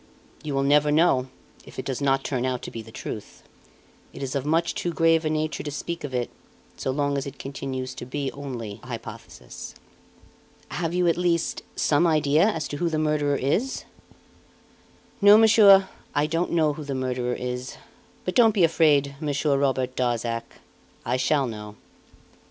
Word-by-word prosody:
"You 150 -3 -4
will 135 - +1
never 150 +1 +4
know 150 -5 +3 0.4
if - - -14
it - - -4
does 135 0 -3
not 135 -1 +2
turn 130 -3 -2
out 130 -1 -2
to - - -6
be 115 - -6
the 110 0 -13
truth. 65 - -8 0.7
It - - -7
is 135 - -3
of 140 0 -2
much 165 +2 +1
too 175 - -2
grave 165 -1 +3
a - - +1
nature 155 0 -1
to 150 - -5
speak 165 +4 -5
of 145 - -5
it, 125 -2 -2 0.4
so - - -4
long 140 +1 0
as 135 - -5
it 140 0 -8
continues 130 -1 -5
to 120 - -8
be 140 +1 -3
only 120 -7 -7
a - - -14
hypothesis." 115 -1 -9 0.9
"Have 170 0 -2
you, 180 -1 +2
at 170 - +2
least, 170 -2 0
some 155 +4 +3
idea 155 +2 +3
as 165 -9 -1
to 145 - -4
who 170 +2 0
the 160 - -1
murderer 150 -2 +1
is?" 185 - -1 1.4
"No, 205 +1 +9
monsieur, 205 -3 +7 0.3
I 145 - +3
don't 165 +3 -1
know 155 -3 +2
who 150 - -7
the 140 -2 -4
murderer 125 -1 -2
is; 125 0 -5 0.5
but 185 - -1
don't 225 -3 +5
be 190 - +4
afraid, 150 -4 +3
Monsieur 145 -1 0
Robert 130 -2 0
Darzac 120 -2 -2 0.4
I - - 0
shall 135 +2 +2
know." 105 -3 -7
145 Hz, 180 wpm, -25 LUFS, 130-160 Hz, 1.4 s, No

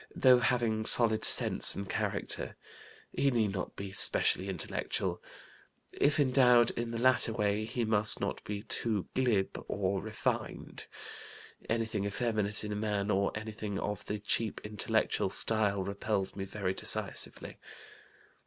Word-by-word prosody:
Though 130 -2 +5
having 115 -3 0
solid 110 -2 +3
sense - - +5
and 100 0 -6
character, - - -3 0.6
he 140 - +1
need 115 -6 0
not 95 - -5
be 100 -1 -7
specially 95 0 +3
intellectual. 90 -4 -3 0.7
If 145 +1 +1
endowed 125 -3 +4
in 120 0 -4
the 115 - -4
latter 130 -1 +2
way, 105 -1 -1
he 115 +1 -3
must 110 -1 +3
not - - -4
be 105 0 -6
too 110 -4 -2
glib 115 -7 -1
or 100 -1 -2
refined. 110 0 -4 0.8
Anything 110 -3 -1
effeminate 105 -1 0
in 105 - -5
a - - -3
man, 105 -1 -2
or 100 0 +1
anything 105 -1 -5
of 105 0 -4
the 105 - -3
cheap 105 +2 -1
intellectual 105 -1 -1
style, 105 -3 +1
repels 100 0 -3
me 95 -1 -5
very 95 -1 -3
decisively. - - 0
105 Hz, 135 wpm, -31 LUFS, 100-115 Hz, 0.8 s, Though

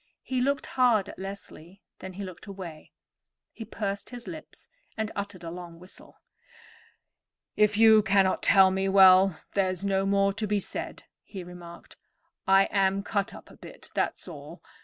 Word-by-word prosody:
He 255 -1 -2
looked 280 +2 0
hard 235 -6 +2
at - - -11
Leslie, 195 -1 -10 0.2
then 190 0 -8
he 200 +2 -7
looked 185 +2 -10
away. 180 -6 -9 0.6
He 225 - -9
pursed 200 -2 -5
up - - -15
his 240 0 -9
lips 315 -1 -11 0.3
and 220 0 -3
uttered 200 -3 -6
a 165 - -6
long 175 -1 -9
whistle. 180 +2 -13 1.4
"If 210 -1 +2
you 220 -1 +7
cannot 195 -2 +2
tell 190 -1 +6
me, 190 +1 -1
well, 190 -2 +6
there's 190 -1 -1
no 195 0 0
more 195 0 +2
to 215 +1 -3
be 205 0 0
said," - - -6 0.2
he 190 -3 -9
remarked. 175 -1 -12 0.5
"I 195 0 +6
am 195 0 +1
cut 200 -2 -2
up - - -14
a - - -15
bit, - - -14
that's - - -2
all. - - -11
195 Hz, 165 wpm, -27 LUFS, 185-205 Hz, 1.4 s, you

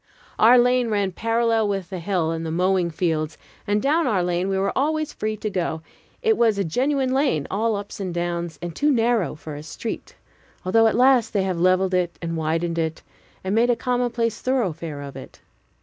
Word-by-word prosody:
Our 235 +3 +7
lane 245 0 +3
ran 205 -3 0
parallel 225 +2 +1
with 195 -2 -3
the 185 - -4
hill 170 -2 0
and 165 0 -3
the 165 - -3
mowing 180 +1 +1
fields, 160 -2 -1 0.3
and 205 +1 +2
down 310 +3 +2
our 195 -7 +1
lane 180 +2 0
we 195 - 0
were 195 +1 0
always 310 +2 0
free 215 0 -3
to 215 - -4
go. 170 -4 -2 0.4
It 445 -2 +3
was 225 -3 +3
a 200 - +1
genuine 260 - 0
lane, 265 - +1
all 220 +2 +1
ups 200 0 -6
and 190 -2 -3
downs, 170 -2 -3
and 170 -2 -5
too 295 - +2
narrow 230 - +1
for 155 0 -8
a 145 - -7
street, 160 +9 -6 0.5
although 225 +5 +4
at 220 - +1
last 250 -2 +4
they 200 -2 +2
have 185 -3 -2
leveled 185 +1 +3
it 180 -2 0
and 165 -1 -4
widened 165 +1 -1
it, 160 -1 -2 0.4
and 190 +1 -2
made 230 +3 +3
a 240 - +4
commonplace 240 -2 -1
thoroughfare 170 - -2
of 140 -2 -9
it. 135 - -11
195 Hz, 200 wpm, -23 LUFS, 170-235 Hz, 0.5 s, Our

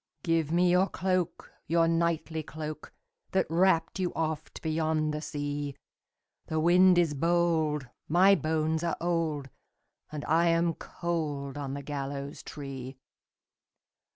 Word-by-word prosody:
"Give 165 -2 +1
me 175 +1 +4
your 180 +2 +4
cloak, 185 -2 -1 0.2
your 165 0 +3
knightly 165 -1 0
cloak, 155 0 -7 0.4
That 190 - +3
wrapped 175 +1 +2
you 180 -2 0
oft 160 -1 -3
beyond 155 -1 0
the 150 - -3
sea; 145 -2 -4 0.7
The 160 - -1
wind 180 +2 +6
is 170 -4 +3
bold, 160 -2 +1 0.2
my 185 +5 +6
bones 160 -2 0
are 170 - -1
old, 160 -5 -1 0.6
And 150 -1 -5
I 165 +2 +3
am 165 0 +2
cold 150 -6 -3
on 140 -2 -4
the 140 - -6
gallows 140 0 -5
tree." 135 -2 -7
160 Hz, 125 wpm, -29 LUFS, 145-170 Hz, 0.7 s, wind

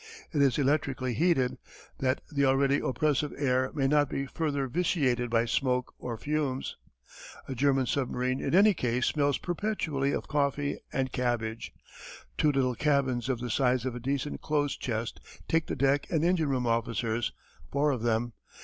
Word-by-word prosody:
It 145 - +2
is 135 -3 +3
electrically 135 -3 0
heated, 130 -5 +1 0.4
that 130 0 0
the 140 -2 +1
already 135 +1 +3
oppressive 150 +1 0
air 130 -2 +1
may 135 -3 +2
not 145 0 +3
be 135 - -2
further 140 -1 -2
vitiated 130 -6 +1
by 115 0 +2
smoke 125 +1 0
or 120 -2 -4
fumes. 145 0 -2 0.7
A - - -3
German 135 +1 +2
submarine 130 0 -1
in - - 0
any 205 +2 +6
case 125 -5 0
smells 145 -3 +1
perpetually 165 -7 -1
of - - -3
coffee 145 0 0
and 130 -1 -1
cabbage. 115 -3 -2 0.6
Two 150 - +3
little 130 -2 +1
cabins 135 -2 +1
of 125 -3 -1
the 120 -2 -3
size 125 -1 +2
of 130 - -2
a 125 - -5
decent 140 +3 -2
clothes 145 -2 0
chest 115 -1 -3 0.3
take 165 0 +1
the - - -2
deck 140 +1 +2
and 160 -2 +1
engine 170 -4 +2
room 130 -2 0
officers, 115 0 0 0.4
four 145 +1 +2
of 125 -5 -2
them. 115 0 0
135 Hz, 165 wpm, -29 LUFS, 125-145 Hz, 0.7 s, any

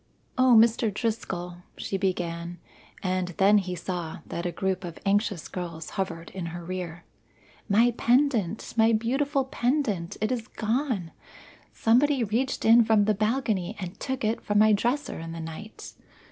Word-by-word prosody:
"O, 255 -1 +5
Mr. 225 -1 +4
Driscoll," 195 -5 -3 0.2
she - - -4
began, 175 -3 -2 0.5
and 185 -1 0
then 205 +1 +5
he 180 -2 -4
saw 175 -2 -4
that 170 +1 -4
a - - -2
group 190 +2 -2
of 170 -2 -7
anxious 200 -3 +1
girls 170 -3 -6
hovered 185 -4 -4
in 185 -3 -5
her 170 +1 -7
rear 175 -2 -5 0.7
"my 230 +4 +5
pendant! 240 -6 +1
my 225 0 +4
beautiful 270 +5 +1
pendant! 240 - -1
It 215 +3 0
is 240 -2 -2
gone! 225 - -2 0.6
Somebody 255 +3 +3
reached 240 +6 -1
in 230 +1 +7
from 220 -2 +3
the 215 - +3
balcony 215 -3 0
and 180 -2 -7
took 265 -2 -3
it 220 +2 0
from 205 - 0
my 215 +1 +6
dresser 245 - -1
in 165 0 -6
the 165 - -6
night. 165 +7 -8
205 Hz, 155 wpm, -27 LUFS, 180-235 Hz, 0.7 s, in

